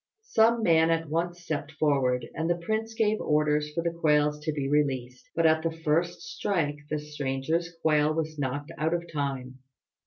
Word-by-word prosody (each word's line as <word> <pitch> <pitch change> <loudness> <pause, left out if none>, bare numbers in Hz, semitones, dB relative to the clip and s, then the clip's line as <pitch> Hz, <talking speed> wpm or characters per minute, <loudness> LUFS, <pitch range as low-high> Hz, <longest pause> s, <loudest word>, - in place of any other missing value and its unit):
Some 230 - +3
man 165 -3 +4
at 165 -1 0
once 175 +2 -2
stepped 155 -2 -4
forward, 135 -5 +1
and 165 +1 -2
the 175 - +2
prince 220 +5 -2
gave 215 -1 +1
orders 150 0 +1
for 165 +2 -2
the 170 -1 -1
quails 150 -2 +2
to 155 +1 -2
be 145 -2 -2
released; 130 -4 -1
but 165 - +2
at 160 0 +4
the 165 - 0
first 165 +2 -1
strike 150 -7 -1
the 150 - 0
stranger's 150 +3 -2
quail 150 -1 +3
was 155 -1 -3
knocked 145 +3 -3
out 160 +2 +1
of 170 - -2
time. 135 -3 -3
155 Hz, 180 wpm, -28 LUFS, 145-170 Hz, -, man